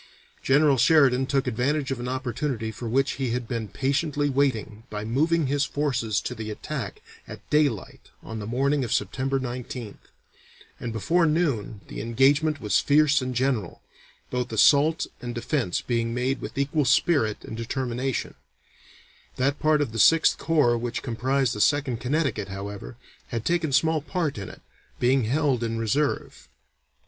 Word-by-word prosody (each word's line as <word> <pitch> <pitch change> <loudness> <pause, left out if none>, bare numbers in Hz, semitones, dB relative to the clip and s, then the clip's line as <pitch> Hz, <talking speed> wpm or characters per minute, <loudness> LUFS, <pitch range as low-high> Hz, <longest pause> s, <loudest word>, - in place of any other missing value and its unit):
General 140 0 +4
Sheridan 130 -1 +4
took 135 0 +1
advantage 135 +4 -1
of 130 - -2
an 120 - -4
opportunity 130 -2 -3
for 115 +2 -6
which 135 +3 +1
he 130 - 0
had 120 0 -2
been 115 -3 -3
patiently 145 +3 0
waiting 115 -6 0
by 105 0 -5
moving 155 +8 +1
his 140 +1 +1
forces 130 -9 -1
to - - -4
the 110 -2 -6
attack 105 - -6 0.2
at - - -11
daylight 145 -9 0
on 115 -1 -6
the 105 - -6
morning 135 +4 +1
of 120 - -4
September 135 +7 0
19th, 125 -3 -6 0.7
and 120 - -4
before 165 - +2
noon 135 - -1
the - - -6
engagement 140 +7 +2
was 105 -5 +2
fierce 150 0 +3
and 130 0 -4
general, 120 -7 -1 0.5
both 125 -1 -2
assault 145 +9 +4 0.2
and 120 -1 -5
defence 120 - -1
being 115 -1 -1
made 130 +2 -1
with - - -7
equal 145 +2 +1
spirit 125 -4 +2
and - - -7
determination; 125 +2 -3 1.0
that 135 +3 0
part 155 -1 +3
of 140 -6 -1
the 115 - -4
Sixth 165 +8 +5
Corps 145 -8 +2
which 120 0 -4
comprised 130 +2 0
the 105 - -3
Second 145 -3 +2
Connecticut, 130 -5 -1
however, 100 -9 -7 0.3
had 115 -1 -4
taken 170 -3 +1
small 160 +3 +2
part 155 - -2
in 100 - -6
it, - - -14 0.4
being 125 0 +3
held 135 0 +1
in 115 0 -2
reserve. 135 +6 -1
130 Hz, 155 wpm, -25 LUFS, 115-145 Hz, 1.0 s, Sixth